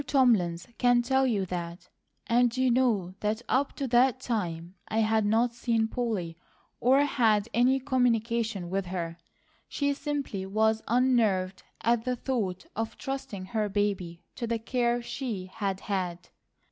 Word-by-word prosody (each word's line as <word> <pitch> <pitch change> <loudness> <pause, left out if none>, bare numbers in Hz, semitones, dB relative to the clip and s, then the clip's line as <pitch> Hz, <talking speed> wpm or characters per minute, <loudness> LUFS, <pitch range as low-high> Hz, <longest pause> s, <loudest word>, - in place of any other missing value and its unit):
Thomlins 210 -11 +2
can 245 -1 +4
tell 265 +2 +2
you 205 -6 0
that; 175 -1 -6 0.4
and 240 +1 +2
you 255 -1 +3
know 225 -8 +1
that 215 +3 -1
up 275 +2 +1
to 275 - -2
that 250 +1 +4
time 175 -9 -3
I 225 - +1
had 220 -1 +2
not 230 +3 +2
seen 230 -1 0
Polly, 210 -9 -3 0.4
or 265 +3 +4
had 225 -7 +2
any 255 +3 +3
communication 230 -7 0
with 195 -1 -1
her. 170 -2 -4 0.5
She 285 -1 0
simply 280 -10 -3
was 220 +2 +2
unnerved 220 -7 +2 0.2
at 235 -1 +2
the 250 0 -1
thought 220 -8 -2
of 225 +1 -3
trusting 270 -9 -5
her 215 -2 0
baby 195 -4 -2
to 235 - -3
the 230 0 0
care 240 +1 0
she 235 -7 -4
had 195 -1 -3
had." 180 -4 -3
225 Hz, 145 wpm, -28 LUFS, 190-250 Hz, 0.5 s, can